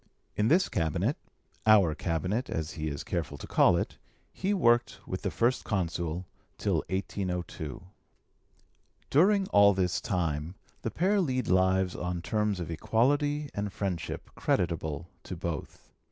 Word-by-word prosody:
In 105 Hz, -, +2 dB
this 175 Hz, +8 st, +4 dB
cabinet 80 Hz, -4 st, 0 dB, 0.5 s
our 100 Hz, -7 st, +6 dB
cabinet, 90 Hz, +9 st, -1 dB
as 80 Hz, 0 st, -2 dB
he 80 Hz, -1 st, -4 dB
is 70 Hz, -2 st, -4 dB
careful 75 Hz, -4 st, -3 dB
to -, -, -8 dB
call -, -, +4 dB
it -, -, -3 dB, 0.3 s
he 195 Hz, +2 st, -1 dB
worked 120 Hz, -11 st, +3 dB
with -, -, -4 dB
the -, -, -1 dB
First 120 Hz, +2 st, +1 dB
Consul 85 Hz, -3 st, -2 dB, 0.3 s
till -, -, +1 dB
1802. 90 Hz, -5 st, -3 dB, 1.3 s
During 195 Hz, +7 st, +5 dB
all 100 Hz, -1 st, +6 dB
this 90 Hz, -2 st, 0 dB
time 85 Hz, -2 st, -1 dB, 0.3 s
the -, -, -2 dB
pair 195 Hz, -, +2 dB
lead 130 Hz, -6 st, -1 dB
lives 95 Hz, 0 st, +3 dB
on 90 Hz, -1 st, -3 dB
terms 105 Hz, 0 st, 0 dB
of 85 Hz, -1 st, -4 dB
equality 145 Hz, -, +1 dB
and 100 Hz, 0 st, -3 dB
friendship 90 Hz, -6 st, -4 dB
creditable 85 Hz, -2 st, -1 dB
to 90 Hz, -, -6 dB
both. 85 Hz, -3 st, -6 dB
95 Hz, 140 wpm, -29 LUFS, 85-120 Hz, 1.3 s, our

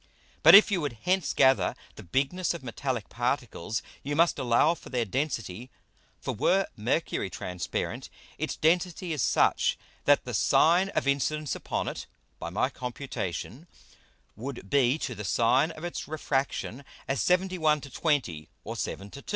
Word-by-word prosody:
But, 160 Hz, +4 st, +10 dB
if 210 Hz, +2 st, +8 dB
you 185 Hz, -4 st, +1 dB
would 145 Hz, -4 st, -2 dB
hence 185 Hz, -1 st, +1 dB
gather 130 Hz, 0 st, +3 dB, 0.2 s
the -, -, -11 dB
Bigness 140 Hz, -, -1 dB
of 170 Hz, -, -9 dB
metallick 125 Hz, -1 st, -3 dB
Particles, 120 Hz, -4 st, -2 dB, 0.2 s
you 145 Hz, +2 st, -3 dB
must 165 Hz, -1 st, +3 dB
allow 130 Hz, +5 st, +3 dB
for -, -, -12 dB
their 125 Hz, -3 st, 0 dB
Density. 120 Hz, -2 st, -3 dB, 0.5 s
For -, -, -3 dB
were 190 Hz, -, +2 dB
Mercury 110 Hz, -, -1 dB
transparent, 90 Hz, 0 st, -4 dB, 0.3 s
its -, -, -2 dB
Density 175 Hz, +1 st, +1 dB
is 150 Hz, -, -2 dB
such -, -, +2 dB, 0.3 s
that -, -, +4 dB
the -, -, -5 dB
Sine 175 Hz, +4 st, +4 dB
of -, -, 0 dB
Incidence 145 Hz, +2 st, 0 dB
upon -, -, -3 dB
it -, -, -5 dB, 0.3 s
(by -, -, -5 dB
my 100 Hz, +8 st, +1 dB
Computation) 125 Hz, -, -5 dB, 0.7 s
would 120 Hz, -3 st, -7 dB
be 135 Hz, 0 st, +3 dB
to 140 Hz, -5 st, -4 dB
the 105 Hz, -, -7 dB
Sine 120 Hz, +8 st, +3 dB
of 160 Hz, -1 st, -10 dB
its 175 Hz, -, -5 dB
Refraction, 140 Hz, -4 st, -2 dB, 0.2 s
as 135 Hz, -, 0 dB
71 180 Hz, -5 st, +2 dB
to 140 Hz, -, -10 dB
20, 95 Hz, -, -1 dB
or 115 Hz, -, -6 dB
7 100 Hz, -2 st, -5 dB
to 140 Hz, -, -9 dB
2. -, -, -29 dB
140 Hz, 160 wpm, -28 LUFS, 115-160 Hz, 0.7 s, But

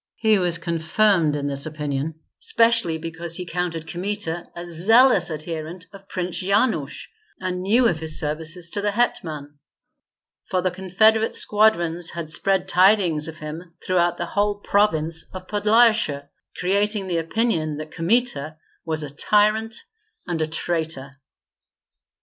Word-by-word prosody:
He 220 Hz, -2 st, +3 dB
was 175 Hz, -2 st, +1 dB
confirmed 170 Hz, 0 st, +1 dB
in 145 Hz, -1 st, -3 dB
this 140 Hz, +1 st, 0 dB
opinion 150 Hz, 0 st, -3 dB, 0.2 s
specially 230 Hz, -, +2 dB
because 165 Hz, +1 st, -4 dB
he 180 Hz, -, -4 dB
counted 170 Hz, -2 st, -3 dB
Kmita 175 Hz, -2 st, -3 dB
a 175 Hz, 0 st, -6 dB
zealous 195 Hz, +3 st, +4 dB
adherent 160 Hz, +2 st, -6 dB
of 195 Hz, 0 st, -14 dB
Prince 180 Hz, -2 st, -3 dB
Yanush, 195 Hz, -, 0 dB, 0.3 s
and 180 Hz, -1 st, -3 dB
knew 230 Hz, +6 st, +3 dB
of 165 Hz, -6 st, -1 dB
his 160 Hz, -1 st, -1 dB
services 160 Hz, +3 st, -4 dB
to 205 Hz, -, -1 dB
the 205 Hz, -, 0 dB
hetman; 155 Hz, -10 st, -2 dB, 0.9 s
for 185 Hz, -, -1 dB
the 185 Hz, -, +1 dB
confederate 215 Hz, +5 st, +2 dB
squadrons 175 Hz, -6 st, +2 dB
had 165 Hz, -2 st, -6 dB
spread 190 Hz, +2 st, +1 dB
tidings 180 Hz, -5 st, +3 dB
of 160 Hz, -1 st, -8 dB
him 165 Hz, +2 st, -8 dB
throughout 175 Hz, -1 st, +1 dB
the 175 Hz, -, -3 dB
whole 205 Hz, +3 st, 0 dB
province 165 Hz, -6 st, +1 dB
of 185 Hz, 0 st, -7 dB
Podlyasye, 210 Hz, -8 st, +3 dB, 0.3 s
creating 200 Hz, +2 st, +1 dB
the 175 Hz, -2 st, -1 dB
opinion 165 Hz, -4 st, -1 dB
that 155 Hz, 0 st, -7 dB
Kmita 165 Hz, -, 0 dB, 0.3 s
was 160 Hz, -1 st, -1 dB
a 145 Hz, -1 st, -7 dB
tyrant 215 Hz, -, +2 dB, 0.4 s
and 170 Hz, -3 st, -3 dB
a 155 Hz, -, 0 dB
traitor. 160 Hz, -4 st, -3 dB
175 Hz, 140 wpm, -22 LUFS, 160-205 Hz, 0.9 s, zealous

